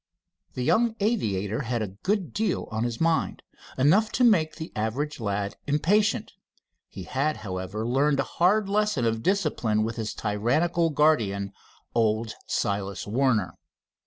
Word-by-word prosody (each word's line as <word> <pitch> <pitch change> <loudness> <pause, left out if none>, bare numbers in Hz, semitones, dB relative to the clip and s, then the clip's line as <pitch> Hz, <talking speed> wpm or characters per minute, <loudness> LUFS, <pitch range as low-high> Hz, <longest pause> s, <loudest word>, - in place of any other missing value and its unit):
The 125 - -2
young 225 - +2
aviator 110 - 0
had 120 -3 -2
a 105 - -4
good 190 - -1
deal 220 0 -1
on 110 +2 -1
his 120 -1 -3
mind, 165 0 0 0.3
enough 185 +12 +4
to 250 - +2
make 175 -10 +4
the 160 0 -7
average 125 +8 -2
lad 100 -2 -2
impatient. 200 +9 +2 0.6
He 95 - -9
had, 140 +7 -1
however, 95 +3 -4
learned 140 +3 +2
a - - +3
hard 195 +8 +2
lesson 205 - +1
of 115 -1 0
discipline 115 - +1
with 115 +2 -3
his 110 -2 -3
tyrannical 140 +11 +1
guardian, 110 -11 +1 0.4
old 110 -1 +1
Silas 100 -1 -2
Warner. 115 -3 0
130 Hz, 140 wpm, -26 LUFS, 110-170 Hz, 0.6 s, enough